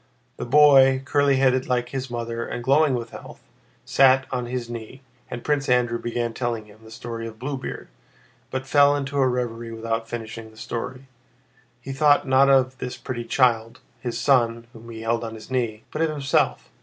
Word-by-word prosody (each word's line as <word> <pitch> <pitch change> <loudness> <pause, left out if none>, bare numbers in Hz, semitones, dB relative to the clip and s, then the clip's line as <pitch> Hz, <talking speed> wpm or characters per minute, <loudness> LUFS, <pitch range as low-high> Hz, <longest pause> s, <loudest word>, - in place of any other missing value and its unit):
The - - -5
boy, 135 -1 +6
curly 140 -1 +2
headed 130 -1 +2
like 125 -1 0
his 130 0 -4
mother 115 -1 -4
and 120 - -5
glowing 140 +2 +3
with 115 -2 -5
health, - - -11 0.4
sat 135 -1 +4
on 125 -2 -2
his 125 -1 -4
knee, 120 +3 -9 0.3
and 120 - -6
Prince 145 -2 0
Andrew 120 -1 +2
began 120 0 -3
telling 120 -3 -3
him 105 0 -18
the 110 - -14
story 115 0 -6
of 110 -1 -10
Bluebeard, 130 +2 -5 0.6
but 130 0 -4
fell 145 +1 +5
into 140 0 -2
a 135 - +4
reverie 120 -2 -3
without 115 0 -3
finishing 115 -1 -7
the 110 - -20
story. 125 +4 -6 0.8
He 135 +3 -6
thought 145 +1 +3
not 135 +1 +5
of 130 -1 +3
this 125 - -5
pretty 120 -2 -5
child, 115 -1 +1 0.2
his 120 -1 -4
son 115 -2 +2
whom 115 +1 -13
he 115 -1 -8
held 115 +1 -1
on 115 -1 -6
his 110 +4 -12
knee, 115 -4 -2
but 155 - -3
of 165 - +2
himself. 145 -2 0
125 Hz, 185 wpm, -23 LUFS, 115-135 Hz, 0.8 s, boy